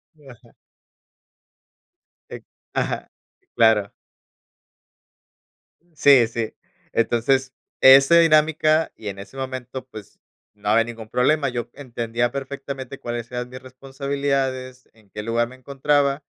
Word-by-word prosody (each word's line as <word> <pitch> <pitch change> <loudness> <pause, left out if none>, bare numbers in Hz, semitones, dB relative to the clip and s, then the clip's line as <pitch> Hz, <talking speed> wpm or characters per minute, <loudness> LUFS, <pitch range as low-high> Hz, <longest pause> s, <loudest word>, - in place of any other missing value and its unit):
Sí, 145 -3 -20
ajá. 120 -1 -16 1.8
Ex - - -9 0.3
ajá. - - -2 0.5
Claro. 110 -3 +3 2.0
Sí, 135 -6 +6
sí. 115 -1 -4 0.4
Entonces, 130 +3 +1 0.3
ese 135 +5 +8
dinámica, 155 0 +3
y 110 - -10
en 100 0 -8
ese 115 +7 -11
momento, 130 -1 -6
pues, 110 -5 -12 0.3
no 105 0 -5
había 115 +1 +4
ningún 115 -2 -9
problema, 135 +3 +2
yo 120 -1 -4
entendía 120 -2 -3
perfectamente 135 -1 -6
cuáles 120 0 -5
eran 125 0 -4
mis 130 +1 -10
responsabilidades, 135 -1 -3
en 110 -3 -25
qué 105 - -6
lugar 115 +1 0
me 130 - -13
encontraba, 140 +2 0
130 Hz, 115 wpm, -22 LUFS, 115-140 Hz, 2.0 s, ese